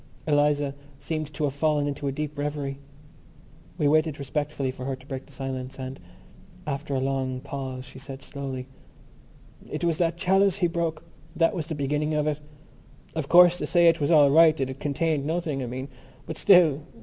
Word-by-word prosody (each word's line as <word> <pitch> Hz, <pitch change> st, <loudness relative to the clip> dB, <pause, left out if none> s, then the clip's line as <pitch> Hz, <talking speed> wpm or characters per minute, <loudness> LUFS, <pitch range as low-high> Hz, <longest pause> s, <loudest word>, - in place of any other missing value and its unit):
Eliza 145 Hz, -1 st, +2 dB, 0.2 s
seemed 155 Hz, +1 st, -4 dB
to 155 Hz, -, -4 dB
have 140 Hz, -2 st, 0 dB
fallen 150 Hz, 0 st, +1 dB
into 145 Hz, 0 st, -3 dB
a -, -, 0 dB
deep 150 Hz, +1 st, -4 dB
revery. 145 Hz, -1 st, -3 dB, 1.0 s
We 145 Hz, -, +2 dB
waited 155 Hz, 0 st, +2 dB
respectfully 140 Hz, -1 st, -2 dB
for 130 Hz, 0 st, -9 dB
her 135 Hz, 0 st, -2 dB
to 130 Hz, 0 st, -18 dB
break 135 Hz, -1 st, -6 dB
the -, -, -17 dB
silence: 130 Hz, -1 st, -5 dB
and 130 Hz, 0 st, -6 dB, 0.7 s
after 140 Hz, 0 st, -3 dB
a -, -, +1 dB
long 130 Hz, -1 st, -1 dB
pause 130 Hz, -2 st, -6 dB
she 130 Hz, -, -12 dB
said 135 Hz, 0 st, -9 dB
slowly: 135 Hz, -3 st, -6 dB, 1.0 s
"It -, -, -4 dB
was 165 Hz, -2 st, +1 dB
that 170 Hz, -1 st, +1 dB
chalice 195 Hz, +1 st, +3 dB
he 185 Hz, -, +2 dB
broke.... 165 Hz, -2 st, -2 dB, 0.3 s
That 165 Hz, +4 st, +3 dB
was 165 Hz, -5 st, -3 dB
the 160 Hz, -, -3 dB
beginning 150 Hz, +2 st, -1 dB
of 150 Hz, 0 st, +1 dB
it. 150 Hz, -1 st, -1 dB, 0.7 s
Of 160 Hz, -4 st, -3 dB
course, 175 Hz, 0 st, +7 dB
they -, -, -2 dB
say 170 Hz, -1 st, +4 dB
it 165 Hz, 0 st, +1 dB
was 145 Hz, -, +1 dB
all 150 Hz, -4 st, +6 dB
right, 160 Hz, +1 st, +6 dB
that 130 Hz, -1 st, -1 dB
it 130 Hz, -, -9 dB
contained 150 Hz, 0 st, 0 dB
nothing, 160 Hz, -4 st, -1 dB
I 125 Hz, -, -3 dB
mean. 130 Hz, +3 st, -5 dB, 0.4 s
But 160 Hz, -, -6 dB
still.... 170 Hz, -7 st, +5 dB
145 Hz, 190 wpm, -26 LUFS, 135-160 Hz, 1.0 s, course